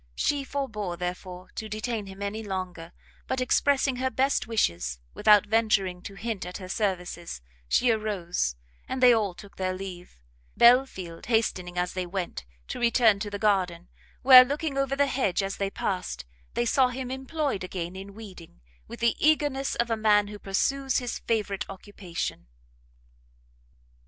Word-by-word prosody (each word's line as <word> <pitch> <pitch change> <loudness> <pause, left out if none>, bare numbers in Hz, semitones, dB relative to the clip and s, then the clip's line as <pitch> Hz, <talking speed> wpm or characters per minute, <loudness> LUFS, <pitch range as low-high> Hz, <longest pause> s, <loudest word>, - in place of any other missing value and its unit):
She 285 -1 0
forbore, 220 -11 -3
therefore, 180 +1 -6
to 220 - -6
detain 215 -1 -3
him 195 +1 -8
any 205 +2 -3
longer, 185 -4 -5 0.4
but 260 - -1
expressing 265 +1 +2
her 260 +1 0
best 265 -1 +1
wishes, 85 - 0 0.2
without 210 - +5
venturing 205 -4 +1
to 195 - -9
hint 220 -1 -4
at 180 +1 -6
her 185 -2 -9
services, 180 - -2 0.3
she 245 -1 +4
arose, 185 - -1 0.3
and 260 0 -2
they 245 -1 +9
all 205 -5 0
took 200 +2 -14
their 185 -1 -1
leave; 180 - -9 0.4
Belfield 235 -9 +3
hastening, 185 -6 0
as 180 0 -1
they 185 -1 -3
went, 175 - -4 0.2
to - - -4
return 235 -3 +4
to 205 0 -3
the 205 - -4
garden, 185 -5 0 0.3
where, 255 -1 +11
looking 285 +2 -3
over 275 0 0
the 285 +1 +3
hedge 250 -9 0
as 195 0 -3
they 195 -1 -1
passed, 180 - -3 0.3
they 240 - +1
saw 255 +2 +4
him 250 0 -5
employed 265 - -2
again 180 -1 -5
in 195 +1 -9
weeding, 190 - -12 0.3
with - - -10
the 235 0 +3
eagerness 290 -3 +2
of 235 0 0
a - - +3
man 210 -2 +3
who 210 0 -8
pursues 265 +8 0
his 245 -2 -3
favourite 210 -3 -2
occupation. 190 - -6
210 Hz, 160 wpm, -27 LUFS, 185-250 Hz, 0.4 s, where